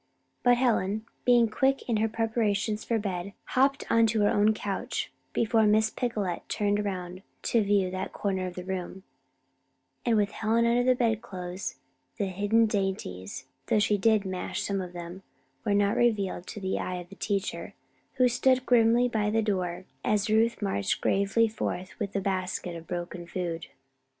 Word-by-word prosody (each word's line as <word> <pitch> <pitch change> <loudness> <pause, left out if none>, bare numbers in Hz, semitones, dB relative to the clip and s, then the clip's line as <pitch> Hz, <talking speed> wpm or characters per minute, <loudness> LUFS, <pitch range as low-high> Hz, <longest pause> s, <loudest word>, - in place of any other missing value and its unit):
But 245 -1 +5
Helen, 220 -4 +1 0.2
being 240 -2 +5
quick 270 +5 +1
in 230 -3 +1
her 220 +1 +1
preparations 215 -1 0
for 230 - 0
bed, 195 -2 -3 0.2
hopped 275 +2 +2
into 225 -1 +4
her 205 - +4
own 210 +1 +4
couch 205 -2 -3 0.2
before 225 -1 +3
Miss 220 +1 +3
Picolet 210 -8 -2
turned 205 0 +1
around 185 -3 -4 0.2
to 230 - +2
view 200 -2 +2
that 185 +1 -4
corner 190 -2 -2
of 180 - -7
the 180 - -5
room, 190 0 -5 1.0
and 235 -2 +2
with 205 0 +2
Helen 225 +2 +1
under 240 +1 +3
the 255 0 +4
bedclothes 200 -6 -2 0.4
the 205 - 0
hidden 205 +4 +2
dainties 190 - -3 0.2
(though - - +3
she 210 0 +3
did 215 0 +3
mash 185 -1 -3
some 195 -1 -1
of 180 -1 -7
them) 175 +2 -7 0.4
were 205 -2 +1
not 200 0 +3
revealed 200 -6 +1
to - - -6
the 190 -1 -2
eye 185 - -3
of 175 -1 -7
the 195 - -11
teacher, 200 -1 -3 0.4
who 255 - +5
stood 255 +1 +2
grimly 240 0 +4
by 215 -3 0
the 220 +1 +1
door 185 -3 -2 0.2
as 210 0 +1
Ruth 225 0 +2
marched 100 - 0
gravely 200 +4 +2
forth 190 -4 -4
with 205 -2 -3
the 195 - 0
basket 185 -2 -2
of 165 0 -9
broken 175 0 -5
food. 175 -2 -4
205 Hz, 170 wpm, -28 LUFS, 185-225 Hz, 1.0 s, But